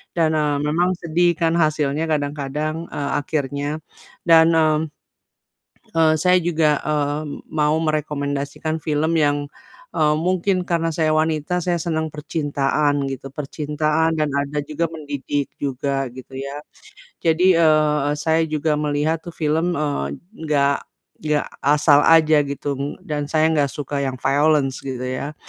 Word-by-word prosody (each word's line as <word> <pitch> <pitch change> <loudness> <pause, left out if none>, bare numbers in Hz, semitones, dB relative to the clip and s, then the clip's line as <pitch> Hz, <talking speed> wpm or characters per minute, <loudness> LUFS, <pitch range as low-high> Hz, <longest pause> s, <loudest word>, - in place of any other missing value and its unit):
dan, 165 -2 +2
eee, 150 -1 +1
memang 170 +4 +2
sedih 175 +2 +2
kan, 165 -1 +3
hasilnya 155 -2 +1
kadang-kadang, 150 +1 -2
eee, 140 -1 -3
akhirnya, 145 -1 -2 0.6
dan, 165 -1 +7
mmm, 155 -1 +3 1.2
eee, 160 -1 +5
saya 180 0 +5
juga, 160 -3 +2
eee, 150 -1 0 0.3
mau 150 0 +1
merekomendasikan 150 0 -2
film 155 +1 +1
yang, 145 -1 +1 0.5
eee, 150 -1 +3
mungkin 185 +2 +1
karena 165 -1 +1
saya 155 0 +1
wanita, 155 +2 0
saya 175 -1 0
senang 160 -1 -1
percintaan 145 -1 0
gitu, 135 0 -6
percintaan 150 +2 -1
dan 150 -1 +1
ada 140 +1 -1
juga 155 +3 -2
mendidik 145 -2 -3
juga, 135 0 -2
gitu 130 0 -11
ya. 140 +2 -6 0.6
Jadi, 175 +3 +4
eee 155 -2 +4
eee, 145 - 0
saya 160 +2 +1
juga 155 0 0
melihat 150 +2 0
film, 160 +3 0
eee, 140 - -2 0.3
nggak 140 -2 +2 0.5
ya 150 -1 +1 0.2
asal 145 0 +5
aja 160 -2 +6
gitu 140 0 -3
dan 145 -1 -3
saya 160 0 +3
nggak 145 -2 +2
suka 145 -1 -4
yang 135 -1 -2
violence 140 -1 +2
gitu 130 -2 -4
ya, 130 +4 -4
150 Hz, 135 wpm, -21 LUFS, 145-160 Hz, 1.2 s, dan